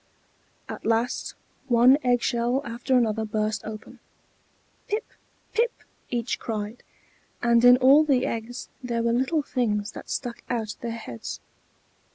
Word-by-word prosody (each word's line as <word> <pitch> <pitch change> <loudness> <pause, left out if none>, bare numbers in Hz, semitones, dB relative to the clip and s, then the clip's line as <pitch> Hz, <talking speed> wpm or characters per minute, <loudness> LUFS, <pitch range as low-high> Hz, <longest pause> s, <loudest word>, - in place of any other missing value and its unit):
At - - -7
last 230 +2 0 0.3
one 250 +3 +6
egg 245 -1 +2
shell 245 +2 +1
after 240 +3 0
another 220 -2 +1
burst 215 0 -1
open. 215 0 -9 0.9
"Pip! 425 +2 -1 0.5
pip!" 465 +1 +2 0.4
each 240 -1 -2
cried, 215 +1 -4 0.6
and 235 0 +4
in 245 0 +9
all 270 +4 +7
the 275 -5 +2
eggs 230 +2 -4
there 235 -2 -2
were 235 0 +2
little 265 +5 +1
things 215 -6 -1
that - - -10
stuck 240 -2 -4
out 220 -4 -2
their 235 - -3
heads. 220 - -6
235 Hz, 135 wpm, -26 LUFS, 225-255 Hz, 0.9 s, in